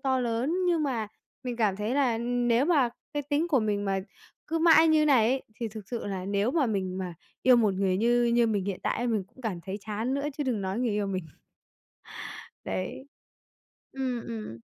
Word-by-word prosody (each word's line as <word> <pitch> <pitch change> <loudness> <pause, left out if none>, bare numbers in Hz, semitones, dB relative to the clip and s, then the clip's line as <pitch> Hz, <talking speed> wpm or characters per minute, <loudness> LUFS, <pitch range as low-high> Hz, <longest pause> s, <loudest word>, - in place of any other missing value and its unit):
to 260 -1 +1
lớn, 240 +7 0
nhưng 330 -3 +2
mà 235 -7 -1 0.4
mình 245 -2 -3
cảm 210 -5 +1
thấy 210 +4 -2
là 255 -5 +2
nếu 240 +1 +2
mà 290 -8 +4 0.3
cái 290 - 0
tính 290 +4 0
của 275 -7 +3
mình 205 -1 0
mà 195 -1 0 0.5
cứ 330 - -1
mãi 325 -1 +6
như 310 -1 +5
này 240 -6 +5
ấy, 265 0 0 0.2
thì 230 - -1
thực 215 -2 -10
sự 235 -4 -4
là 190 -2 -3
nếu 200 +3 +1
mà 285 -1 +2
mình 190 -4 -2
mà 180 -2 -4 0.3
yêu 255 -1 +7
một 210 -5 +3
người 190 -1 +1
như 240 +3 +3
như 235 0 +3
mình 205 -4 0
hiện 195 -2 -3
tại 240 - 0
mình 215 -5 0
cũng 240 +6 -20
cảm 195 -7 -3
thấy 195 +3 -5
chán 220 +5 -1
nữa 280 +1 -1
chứ 290 - 0
đừng 240 -5 0
nói 190 +4 -2
người 245 -3 +1
yêu 205 -1 0
mình. 185 -3 -3 1.4
Đấy. 185 +8 -4 0.9
Ừm, 260 -3 -2
ừm. 215 - -6
235 Hz, 210 wpm, -28 LUFS, 200-260 Hz, 1.4 s, yêu